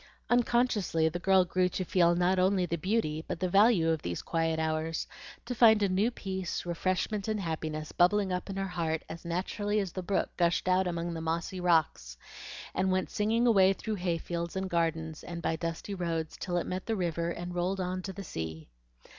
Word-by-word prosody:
Unconsciously 235 -9 +2
the 175 +2 -4
girl 190 0 +4
grew 180 +1 +1
to 185 - -3
feel 175 -1 +3
not 180 +2 +2
only 185 0 +3
the 170 - -2
beauty 170 -4 -1
but - - -4
the 185 - 0
value 195 -3 +4
of 160 -2 -1
these 85 0 -4
quiet 165 -1 0
hours, 160 0 -1 0.4
to 245 - -3
find 220 -3 +6
a 200 - +2
new 195 +5 +2
peace, 190 -7 -4
refreshment, 185 +4 -1
and 215 -1 -1
happiness, 155 -3 -4
bubbling 190 +2 +3
up 180 +2 -3
in 195 - -4
her 195 0 -1
heart 165 -3 -2
as 165 +1 -8
naturally 205 +5 -1
as 195 -3 -2
the 185 - -4
brook 190 +2 -1
gushed 170 +1 +1
out 185 0 +3
among 170 0 -2
the 165 - -5
mossy 165 +3 -2
rocks, 160 - +1 0.6
and 190 0 +1
went 185 0 0
singing 225 +1 +1
away 195 -5 +5
through 220 +2 -4
hayfields 170 -2 -3
and 190 0 -3
gardens, 160 -2 -1
and 170 -1 -6
by 165 - -1
dusty 165 +4 -4
roads, 165 -4 -2
till 175 -2 -3
it 175 - -1
met 185 +1 -4
the 225 - 0
river 170 -3 -1
and 175 +1 -5
rolled 180 +2 -1
on 185 0 -2
to 190 - -5
the 195 +1 -7
sea. 80 - -6
180 Hz, 200 wpm, -30 LUFS, 165-195 Hz, 0.6 s, find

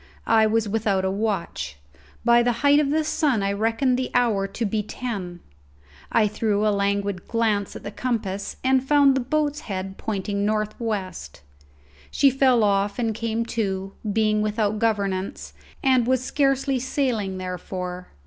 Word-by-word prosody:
I 220 -1 +4
was 220 0 +1
without 200 -3 0
a 190 - +1
watch. 190 - -3 0.5
By 235 0 +6
the 245 +1 +2
height 285 +1 +6
of 295 -2 +1
the 310 +2 +1
sun 295 -8 +1
I 195 - +1
reckoned 225 +5 +1
the 260 - -2
hour 220 -6 +2
to 225 +4 -3
be 215 +1 0
ten. 200 -6 -5 0.7
I 215 -2 +4
threw 210 0 0
a 210 - +3
languid 200 -1 -1
glance 220 -3 0
at - - -8
the 205 - -5
compass 205 -5 -3
and 260 0 +3
found 280 0 +5
the 265 - +1
boat's 295 +3 0
head 190 -6 -5
pointing 200 -1 -2
north 215 0 0
west; 195 - -4 0.7
she 275 -1 +4
fell 255 -3 +3
off 200 0 +1
and 230 -3 0
came 230 +1 -2
to, 195 -3 -2 0.2
being 215 0 +2
without 215 0 0
governance, 200 -4 -1 0.3
and 255 -3 +3
was 255 -1 +2
scarcely 275 -1 +1
sailing 240 -7 -1
therefore. 180 0 -5
215 Hz, 160 wpm, -24 LUFS, 200-250 Hz, 0.7 s, By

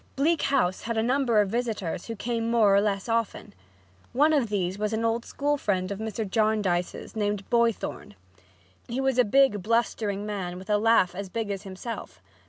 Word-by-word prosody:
Bleak 310 +4 +2
House 245 -10 +1
had 230 -1 -3
a 220 - +2
number 250 -2 +2
of 200 - -1
visitors 220 -8 -2
who 230 - -4
came 230 +1 -2
more 220 -4 +4
or 200 - +5
less 200 -1 -1
often. 230 - -2 0.6
One 300 +5 +4
of 265 -7 +2
these 190 -1 -1
was 210 +1 -1
an 225 +1 0
old 230 +1 0
school 290 +1 -1
friend 185 -6 -1
of 200 - -4
Mr. 220 -1 -3
Jarndyce's, 210 -5 0
named 205 -2 -1
Boythorn. 235 - 0 0.7
He 240 +2 -3
was 265 -1 +1
a - - +7
big, 240 -3 +3
blustering 215 -2 0
man 190 -4 -4
with 190 +3 -6
a 210 - +3
laugh 225 -5 +4
as 195 +1 -6
big 220 +1 -3
as 195 -1 -4
himself. 200 +4 -7
220 Hz, 190 wpm, -26 LUFS, 200-235 Hz, 0.7 s, a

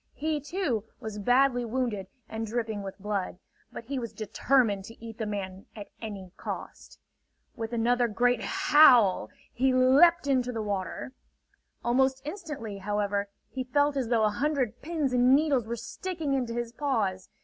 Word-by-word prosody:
He, 305 +3 -1
too, 290 - -2 0.2
was 215 -1 -6
badly 245 +3 +3
wounded 230 -5 -2 0.2
and 225 0 -4
dripping 220 -2 -2
with 195 -1 -7
blood; 200 -3 -3 0.3
but - - -8
he 265 +3 -3
was 235 -2 -6
determined 220 -1 +1
to 225 +2 -12
eat 225 0 -10
the 220 - -2
man 195 -2 -5
at 205 -2 -9
any 200 -5 -7
cost. - - -7 0.6
With 225 0 -5
another 240 +1 +2
great 240 +2 +1
howl, 250 -10 +5 0.2
he 260 +2 +2
leaped 275 +7 +5
into 255 -3 +1
the 225 -2 -3
water. 200 +4 -4 0.7
Almost 265 +2 +2
instantly, 295 - -6
however, 205 0 -1 0.2
he 260 - -3
felt 285 +3 +1
as 265 -4 -1
though 230 -2 +3
a 215 - +4
hundred 265 +1 -1
pins 305 -4 -1
and 250 +1 +5
needles 280 -6 +2
were 235 - -2
sticking 325 - -4
into 245 -4 -1
his 240 -1 -3
paws. 220 -10 -1
240 Hz, 160 wpm, -28 LUFS, 210-270 Hz, 0.7 s, howl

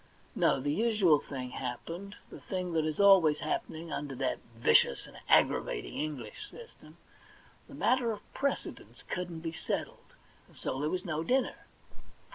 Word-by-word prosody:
No; - - +3
the 145 +2 -1
usual 205 -7 +4
thing 130 -3 -6
hap 125 -1 -4
pened, 200 +5 -7 0.2
the - - -9
thing 180 -2 -3
that 160 -1 +2
is 155 - -3
always 190 -7 +7
happening 160 +2 -3
under 145 -2 -4
that 130 0 -1 0.2
vicious 115 -11 +4
and - - -14
aggravating - - +3
English 140 -8 -5
system 475 0 -14 0.4
— - - -27
the - - -11
matter 250 -2 +2
of 210 -2 -9
precedence 280 0 -3
couldn't 175 -3 -4
be 165 0 -3
settled, - - -4 0.3
and - - -21
so 130 - -3
there 150 - 0
was 185 +3 -2
no 160 -2 -2
dinner. 260 +8 0
165 Hz, 160 wpm, -31 LUFS, 145-200 Hz, 0.4 s, always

